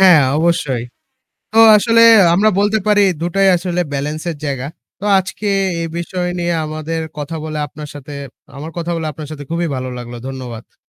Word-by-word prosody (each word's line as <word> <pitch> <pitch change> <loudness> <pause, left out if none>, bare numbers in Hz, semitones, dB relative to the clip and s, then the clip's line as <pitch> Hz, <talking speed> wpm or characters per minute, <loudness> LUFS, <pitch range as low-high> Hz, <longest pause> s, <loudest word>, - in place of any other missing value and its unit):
হ্যাঁ 180 -6 +7 0.2
অবশ্যই। 150 -7 0 0.7
তো 220 - -1 0.2
আসলে 230 +2 +3 0.3
আমরা 210 +5 +4
বলতে 205 +2 +2
পারি 205 -1 +4 0.2
দুটাই 195 +3 +2
আসলে 180 0 -1
বেলেন্স 150 +3 -3
এর - - -7
জায়গা। 135 -1 -3 0.3
তো 205 - -6
আজকে 190 +3 -5 0.3
এই 165 - -2
বিষয় 180 +1 -3
নিয়ে 175 0 0
আমাদের 155 +1 -4 0.2
কথা 150 +3 -5
বলে, 155 -1 -5
আপনার 150 +2 -9
সাথে 145 +1 -9 0.4
আমার 155 +3 -7
কথা 170 0 -3
বলে 160 -1 -3
আপনার 150 +1 -8
সাথে 145 -2 -7
খুবই 170 0 -1
ভালো 130 0 -4
লাগলো। 120 0 -8
ধন্যবাদ। 125 -4 -8
160 Hz, 170 wpm, -17 LUFS, 145-180 Hz, 0.7 s, হ্যাঁ